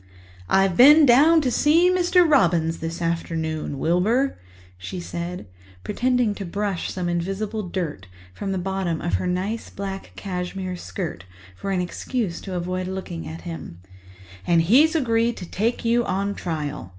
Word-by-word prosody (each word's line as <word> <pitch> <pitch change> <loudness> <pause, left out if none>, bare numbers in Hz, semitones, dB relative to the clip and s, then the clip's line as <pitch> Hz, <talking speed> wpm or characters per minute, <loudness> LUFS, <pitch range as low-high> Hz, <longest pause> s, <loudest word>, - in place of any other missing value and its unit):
"I've 195 -2 +3
been 295 - +8
down 300 +6 +6
to 260 -4 0
see 330 +8 +4
Mr. 360 -1 +4
Robins 170 - +3
this 165 +1 -4
afternoon, 160 -3 -2
Wilbur," 205 - +1 0.4
she 95 - -7
said, 175 -1 -5 0.4
pretending 245 - +1
to 200 - -6
brush 200 0 -3
some 180 -2 -3
invisible 195 +4 -3
dust 155 - -4 0.3
from 195 - -4
the 190 - -1
bottom 185 -3 -2
of 175 - -3
her 185 - -2
nice 190 +6 -2
black 195 -1 -6
cashmere 185 -1 -4
skirt 175 - -6 0.3
for 195 - -6
an 190 -2 +1
excuse 180 +1 -3
to 190 -2 -6
avoid 180 +1 -3
looking 185 - -5
at 80 +1 -7
him, 85 0 -8 0.7
"and 170 -1 +4
he's 280 - +5
agreed 235 -5 +1
to 180 - -6
take 225 +7 -2
you 235 +1 +3
on 200 0 -1
trial. 150 - -4
190 Hz, 150 wpm, -23 LUFS, 170-230 Hz, 0.7 s, been